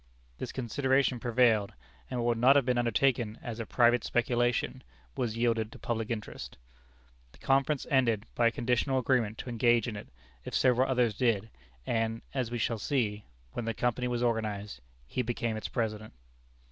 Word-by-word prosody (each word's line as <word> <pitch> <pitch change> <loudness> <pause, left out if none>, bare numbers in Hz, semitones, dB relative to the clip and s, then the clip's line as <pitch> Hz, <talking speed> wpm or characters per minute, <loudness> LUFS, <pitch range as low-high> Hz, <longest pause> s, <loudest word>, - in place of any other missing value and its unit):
This - - -4
consideration 130 +1 +1
prevailed, 115 -4 +2 0.4
and 125 - -3
what 120 - +1
would 120 - +1
not 130 +4 +6
have 140 -3 +4
been 125 -1 +1
undertaken 120 -2 +1
as 115 -1 -6
a 115 - -4
private 120 -1 +3
speculation, 120 0 0 0.3
was 115 -2 -2
yielded 115 -2 +1
to - - -11
public 115 -2 -3
interest. 110 -3 -6 0.8
The - - -17
conference 135 +1 +1
ended 115 -6 +2
by 120 - +3
a - - +2
conditional 125 +1 0
agreement 120 -4 +1
to - - -6
engage 120 -1 +3
in 110 - -4
it, 100 - -8 0.4
if - - -5
several 130 +1 +3
others 125 -4 +2
did, 110 -4 0 0.3
and, 115 0 -1
as 130 -4 -1
we 120 - -3
shall 115 -1 -1
see, 105 -6 -1 0.3
when 120 - -4
the 115 -1 -2
Company 125 +1 0
was 120 0 -1
organized, 105 - -2 0.2
he 95 - -2
became 120 -2 -2
its 110 - -4
President. 110 -3 -3
120 Hz, 170 wpm, -30 LUFS, 110-125 Hz, 0.8 s, not